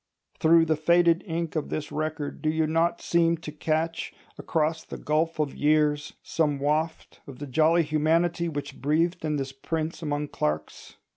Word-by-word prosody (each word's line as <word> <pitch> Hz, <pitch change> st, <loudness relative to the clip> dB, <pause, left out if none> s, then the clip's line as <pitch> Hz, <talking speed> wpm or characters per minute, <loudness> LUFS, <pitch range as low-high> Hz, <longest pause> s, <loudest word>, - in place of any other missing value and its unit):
Through 165 Hz, +1 st, +5 dB
the 160 Hz, -1 st, +2 dB
faded 170 Hz, +2 st, +3 dB
ink 165 Hz, -1 st, -3 dB
of 155 Hz, -, -2 dB
this 155 Hz, -, -4 dB
record 155 Hz, -1 st, -3 dB
do 155 Hz, -, +1 dB
you 160 Hz, 0 st, +1 dB
not 165 Hz, +2 st, +1 dB
seem 170 Hz, -1 st, +2 dB
to 155 Hz, -1 st, -8 dB
catch, 160 Hz, +2 st, -2 dB, 0.2 s
across 160 Hz, 0 st, -1 dB
the -, -, -8 dB
gulf 160 Hz, +2 st, 0 dB
of 150 Hz, -2 st, 0 dB
years, 150 Hz, -1 st, +1 dB
some 150 Hz, -3 st, 0 dB
waft 155 Hz, +3 st, -2 dB
of 135 Hz, -3 st, -9 dB
the 145 Hz, -, -6 dB
jolly 160 Hz, +5 st, +3 dB
humanity 165 Hz, +3 st, +1 dB
which 145 Hz, -2 st, -6 dB
breathed 165 Hz, +5 st, +1 dB
in 155 Hz, -1 st, 0 dB
this 135 Hz, -2 st, -3 dB
prince 160 Hz, +5 st, -4 dB
among 145 Hz, -1 st, -2 dB
clerks? 75 Hz, 0 st, -3 dB
155 Hz, 165 wpm, -26 LUFS, 150-165 Hz, 0.2 s, Through